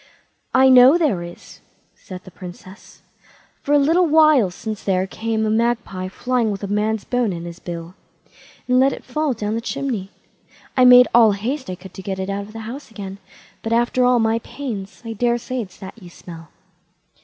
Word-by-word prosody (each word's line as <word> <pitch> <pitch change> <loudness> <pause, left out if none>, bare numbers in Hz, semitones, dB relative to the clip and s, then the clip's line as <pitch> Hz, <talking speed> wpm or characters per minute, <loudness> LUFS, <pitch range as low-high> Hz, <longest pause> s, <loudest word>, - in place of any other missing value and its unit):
"I 265 0 +6
know 255 +4 +7
there 285 - 0
is", 175 0 -11 0.3
said 185 -1 -11
the 185 - -13
Princess; 185 +2 -13 0.6
"for 285 - -4
a - - +6
little 330 +5 +3
while 305 -8 +5
since 215 +3 -7
there 185 -1 +1
came 220 +2 -2
a - - 0
magpie 225 -5 -1
flying 245 +4 -1
with 200 -1 -5
a - - -2
man's 210 +1 -1
bone 245 -4 0
in 170 -1 -6
his 170 0 -9
bill, 170 -1 -7 0.7
and 250 0 +3
let 270 +1 +3
it - - -9
fall 300 +2 -1
down 210 -2 -3
the 230 - -2
chimney. 250 -6 -4 0.7
I 255 - +5
made 250 0 +8
all 225 -3 +6
the - - -5
haste 260 +5 -4
I 185 - -4
could 185 +1 -13
to - - -9
get 190 0 -4
it 190 +1 -3
out 200 0 -4
of 215 - -14
the 225 - -7
house 250 +7 -8
again; 200 -3 -8 0.4
but 225 - -2
after 240 +2 +2
all 250 0 +4
my 225 0 +1
pains, 215 -7 -7
I 225 - -4
daresay 240 +3 -1
it's 190 -5 -10
that 195 +4 -11
you 180 - -12
smell." 165 -2 -12
220 Hz, 200 wpm, -20 LUFS, 190-250 Hz, 0.7 s, made